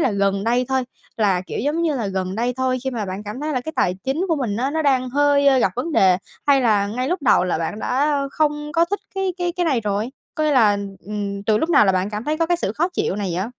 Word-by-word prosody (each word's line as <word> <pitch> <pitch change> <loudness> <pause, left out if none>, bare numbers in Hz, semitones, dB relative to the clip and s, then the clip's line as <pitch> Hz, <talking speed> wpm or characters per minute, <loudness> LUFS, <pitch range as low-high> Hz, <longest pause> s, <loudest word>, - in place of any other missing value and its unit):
là 260 - +2
gần 200 0 0
đây 245 +2 +2
thôi, 265 -1 +1 0.3
là, 195 -5 +2
kiểu, - - -5
giống 295 +7 0
như 315 -3 +1
là, 225 -4 -2
gần 190 -1 -3
đây 240 +3 0
thôi 260 0 0
khi 265 - -1
mà 225 -4 -3
bạn 190 +2 -5
cảm 215 +6 -6
thấy 305 0 -2
là 255 - 0
cái 315 - -6
tài 180 - +2
chính 275 +7 0
của 325 - +2
mình 235 -7 -2
á 265 +4 0
nó 315 +1 -1
đang 255 -3 +1
hơi 280 -1 +4
gặp - - +2
vấn 320 +6 -2
đề? 185 -6 +5 0.3
Hay 280 -2 +5
là 210 -4 +2
ngay 250 +6 -2
lúc 355 -3 -2
đầu 185 - +4
là 180 - -1
bạn 170 +6 -3
đã 285 +5 +1
không 295 0 -1
có 335 0 +4
thích 405 +4 -3
cái 385 -1 -1
cái 350 0 -1
cái 355 - +1
này 265 -6 +2
rồi? 210 +3 -2 0.2
Có 310 - -1
nghĩa 305 - +2
là, 215 -6 +4 0.3
ừm, 200 -1 -4
từ 215 0 +2
lúc 325 +7 -1
nào 215 - +6
là 190 - +3
bạn 185 +3 -1
cảm 210 +2 -5
thấy 305 +3 -1
có 330 - +2
cái 350 +1 +2
sự 210 - -2
khó 335 +8 0
chịu 195 - -1
này 200 -3 -2
vậy? 185 +2 -1
255 Hz, 285 wpm, -21 LUFS, 205-295 Hz, 0.3 s, nào